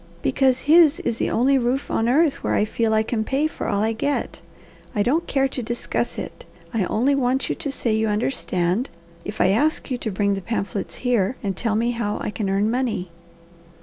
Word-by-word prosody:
"Because 265 Hz, -2 st, +2 dB
his 320 Hz, 0 st, +5 dB
is 235 Hz, -2 st, -2 dB
the -, -, 0 dB
only 265 Hz, +3 st, +3 dB
roof 250 Hz, +3 st, -1 dB
on 225 Hz, +1 st, +1 dB
earth 285 Hz, +1 st, +2 dB
where -, -, +1 dB
I 210 Hz, -, +3 dB
feel 225 Hz, +1 st, 0 dB
I 220 Hz, 0 st, +3 dB
can 220 Hz, 0 st, -1 dB
pay 275 Hz, +6 st, 0 dB
for 310 Hz, -, -3 dB
all 200 Hz, 0 st, +1 dB
I 225 Hz, +1 st, +1 dB
get. 280 Hz, +6 st, -2 dB, 0.5 s
I 205 Hz, -, +2 dB
don't 315 Hz, +9 st, +1 dB
care 270 Hz, -1 st, +2 dB
to 260 Hz, -, -4 dB
discuss 240 Hz, +1 st, -3 dB
it, -, -, -7 dB, 0.3 s
I 215 Hz, -5 st, +1 dB
only 250 Hz, +9 st, +1 dB
want 265 Hz, -1 st, 0 dB
you -, -, 0 dB
to 285 Hz, -, -4 dB
say 235 Hz, -4 st, -1 dB
you 220 Hz, 0 st, +1 dB
understand, 210 Hz, -2 st, 0 dB, 0.3 s
if 210 Hz, +1 st, -7 dB
I 185 Hz, -, +4 dB
ask 290 Hz, +8 st, +1 dB
you 250 Hz, -, -1 dB
to 225 Hz, -, -3 dB
bring 200 Hz, 0 st, +1 dB
the 195 Hz, -, -3 dB
pamphlets 200 Hz, -1 st, -3 dB
here 240 Hz, -2 st, +2 dB
and 195 Hz, -2 st, -1 dB
tell 220 Hz, +2 st, -1 dB
me 235 Hz, +2 st, +1 dB
how 230 Hz, -3 st, -2 dB
I -, -, -3 dB
can 210 Hz, -2 st, -3 dB
earn 200 Hz, +3 st, +1 dB
money." 235 Hz, -8 st, -2 dB
230 Hz, 215 wpm, -23 LUFS, 210-265 Hz, 0.5 s, his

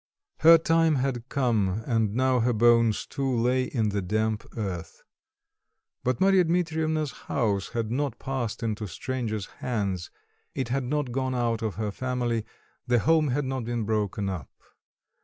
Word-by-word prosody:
Her 165 Hz, +1 st, +9 dB
time 165 Hz, -1 st, +3 dB
had 130 Hz, -2 st, -2 dB
come, 110 Hz, -6 st, +1 dB
and 110 Hz, -4 st, +1 dB
now 130 Hz, 0 st, +3 dB
her 120 Hz, +1 st, +2 dB
bones 115 Hz, 0 st, +4 dB
too 135 Hz, -2 st, -2 dB
lay 125 Hz, +2 st, +2 dB
in 110 Hz, -6 st, 0 dB
the 100 Hz, 0 st, -1 dB
damp 110 Hz, +3 st, -1 dB
earth. 90 Hz, -6 st, -5 dB, 1.0 s
But 125 Hz, -1 st, 0 dB
Marya 190 Hz, -1 st, +5 dB
Dmitreivna's 160 Hz, -3 st, 0 dB, 0.2 s
house 105 Hz, -7 st, 0 dB
had 115 Hz, -2 st, -2 dB
not 135 Hz, -1 st, -1 dB
passed 130 Hz, -4 st, -3 dB
into 110 Hz, -2 st, -2 dB
stranger's 110 Hz, -1 st, -3 dB, 0.2 s
hands, 100 Hz, -7 st, -2 dB, 0.5 s
it 130 Hz, -3 st, -2 dB
had 130 Hz, +1 st, -1 dB
not 145 Hz, -1 st, -1 dB
gone 130 Hz, 0 st, -1 dB
out 115 Hz, -2 st, 0 dB
of 110 Hz, -3 st, -2 dB
her 105 Hz, -1 st, -2 dB
family, 120 Hz, -1 st, -2 dB, 0.4 s
the 125 Hz, 0 st, +3 dB
home 155 Hz, +6 st, +3 dB
had 140 Hz, +2 st, 0 dB
not 130 Hz, -1 st, -2 dB
been 120 Hz, 0 st, -2 dB
broken 105 Hz, -2 st, -1 dB
upon. 90 Hz, -9 st, -4 dB
120 Hz, 155 wpm, -27 LUFS, 110-135 Hz, 1.0 s, Her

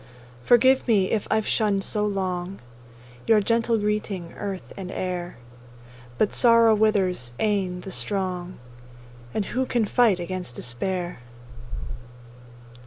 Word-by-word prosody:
Forgive 260 Hz, -, +4 dB
me 200 Hz, -5 st, +2 dB
if 215 Hz, -, -1 dB
I've 220 Hz, -1 st, +1 dB
shunned 205 Hz, -3 st, +1 dB
so 210 Hz, +1 st, +1 dB
long 190 Hz, -1 st, -3 dB, 0.7 s
Your 225 Hz, -2 st, +5 dB
gentle 230 Hz, +2 st, +1 dB
greeting, 205 Hz, -4 st, -3 dB
earth 195 Hz, -2 st, -6 dB
and 185 Hz, -2 st, -7 dB
air! 180 Hz, -4 st, -4 dB, 0.8 s
But 210 Hz, -, +1 dB
sorrow 230 Hz, -2 st, +5 dB
withers 190 Hz, -, +1 dB
e'en 190 Hz, -4 st, 0 dB
the 190 Hz, -, -8 dB
strong, 185 Hz, -2 st, -1 dB, 0.7 s
And 205 Hz, -, -2 dB
who 260 Hz, +5 st, -2 dB
can 235 Hz, -3 st, +1 dB
fight 220 Hz, -4 st, +3 dB
against 180 Hz, -7 st, -4 dB
despair? 175 Hz, +9 st, -3 dB
195 Hz, 115 wpm, -24 LUFS, 180-220 Hz, 0.8 s, Your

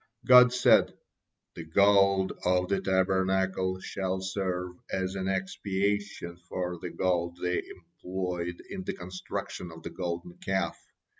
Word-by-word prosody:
God 125 Hz, -1 st, +9 dB
said: 125 Hz, 0 st, +4 dB, 0.6 s
"The 85 Hz, -, -7 dB
gold 100 Hz, +2 st, +4 dB
of 90 Hz, 0 st, +2 dB
the 100 Hz, -, +1 dB
Tabernacle 95 Hz, 0 st, +1 dB
shall 95 Hz, -1 st, -2 dB
serve 95 Hz, -1 st, -2 dB, 0.2 s
as 95 Hz, 0 st, -1 dB
an 95 Hz, -1 st, -3 dB
expiation 95 Hz, -1 st, -2 dB
for 90 Hz, -1 st, -3 dB
the -, -, -5 dB
gold 85 Hz, -2 st, -1 dB
they 90 Hz, 0 st, 0 dB
employed 90 Hz, 0 st, -5 dB
in 195 Hz, -1 st, -5 dB
the 195 Hz, +1 st, -3 dB
construction 90 Hz, -, -6 dB
of 80 Hz, 0 st, -12 dB
the -, -, -6 dB
Golden 85 Hz, -1 st, -5 dB
Calf. 95 Hz, 0 st, -1 dB
95 Hz, 130 wpm, -29 LUFS, 90-95 Hz, 0.6 s, God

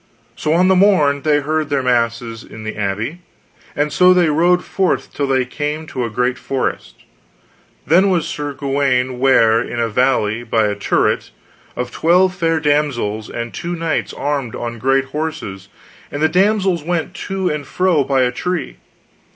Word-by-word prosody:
So 155 Hz, -, -2 dB
on 180 Hz, +2 st, +4 dB
the 190 Hz, -, +4 dB
morn 180 Hz, -8 st, +3 dB
they 150 Hz, -1 st, +2 dB
heard 155 Hz, +1 st, -1 dB
their 140 Hz, -2 st, 0 dB
masses 115 Hz, -2 st, -1 dB
in 110 Hz, -, -11 dB
the 110 Hz, -, -5 dB
abbey, 105 Hz, -, -3 dB, 0.6 s
and 150 Hz, 0 st, -1 dB
so 180 Hz, +4 st, +5 dB
they 175 Hz, -3 st, +3 dB
rode 175 Hz, +4 st, +2 dB
forth 190 Hz, -1 st, -1 dB
till 140 Hz, -, -1 dB
they 130 Hz, -1 st, +1 dB
came 150 Hz, +4 st, -4 dB
to 130 Hz, -5 st, -4 dB
a 115 Hz, -, -2 dB
great 125 Hz, +3 st, -1 dB
forest; 120 Hz, -, -4 dB, 0.8 s
then 185 Hz, +5 st, +4 dB
was 170 Hz, -4 st, +1 dB
Sir 145 Hz, -3 st, -4 dB
Gawaine 135 Hz, -2 st, 0 dB
ware 115 Hz, -4 st, +4 dB
in 120 Hz, 0 st, -5 dB
a 115 Hz, -1 st, 0 dB
valley 115 Hz, -2 st, +1 dB
by 115 Hz, -2 st, +1 dB
a 105 Hz, -, 0 dB
turret, 100 Hz, -, 0 dB, 0.5 s
of 125 Hz, 0 st, -4 dB
twelve 180 Hz, +6 st, +3 dB
fair 165 Hz, -3 st, 0 dB
damsels, 140 Hz, -8 st, 0 dB
and 120 Hz, 0 st, -5 dB
two 175 Hz, 0 st, -4 dB
knights 165 Hz, -2 st, -2 dB
armed 140 Hz, -5 st, -3 dB
on 120 Hz, -1 st, -5 dB
great 135 Hz, +2 st, +2 dB
horses, 135 Hz, -10 st, -5 dB, 0.4 s
and 145 Hz, -, -4 dB
the 155 Hz, -, +3 dB
damsels 190 Hz, 0 st, +2 dB
went 175 Hz, +2 st, -2 dB
to 190 Hz, -2 st, -1 dB
and 150 Hz, -2 st, -4 dB
fro 180 Hz, -6 st, +2 dB
by 135 Hz, -1 st, +1 dB
a 125 Hz, -, +1 dB
tree. 175 Hz, -, -3 dB
145 Hz, 170 wpm, -18 LUFS, 120-165 Hz, 0.8 s, so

